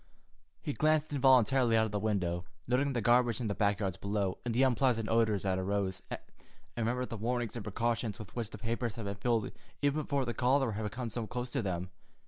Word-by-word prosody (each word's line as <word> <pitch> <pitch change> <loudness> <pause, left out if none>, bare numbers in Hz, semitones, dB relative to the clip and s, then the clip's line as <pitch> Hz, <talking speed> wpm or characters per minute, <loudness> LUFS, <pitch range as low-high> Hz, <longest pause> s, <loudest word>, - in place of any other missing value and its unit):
He 145 - -2
glanced 155 0 +2
involuntarily 130 -3 +4
out 110 - +4
of 110 - -4
the 105 - -1
window, 90 -5 -1 0.2
noting 135 +3 +1
the 120 - 0
garbage 120 0 +4
in 120 - -2
the 105 - 0
back 100 0 +1
yards 95 -4 -2
below, 100 -2 -1
and 120 - -1
the 120 +4 +3
unpleasant 125 -3 +2
odors 110 -3 +2
that 95 -1 +1
arose, 95 -1 -1
and - - -4 0.6
remembered 120 +2 -1
the 115 - -4
warnings 120 +1 -1
and 115 - -4
precautions 115 +1 -1
with 110 - -10
which 115 -4 -3
the - - -9
papers 115 +1 -2
had 115 - -5
been 100 - -2
filled 110 +1 0 0.3
even 145 +2 +2
before 140 -2 0
the 120 - -2
cholera 130 -1 +2
had 105 0 -3
come 120 -1 -4
so 115 0 -3
close 125 +2 -4
to 135 - 0
them. 90 -2 -3
115 Hz, 215 wpm, -32 LUFS, 100-125 Hz, 0.6 s, involuntarily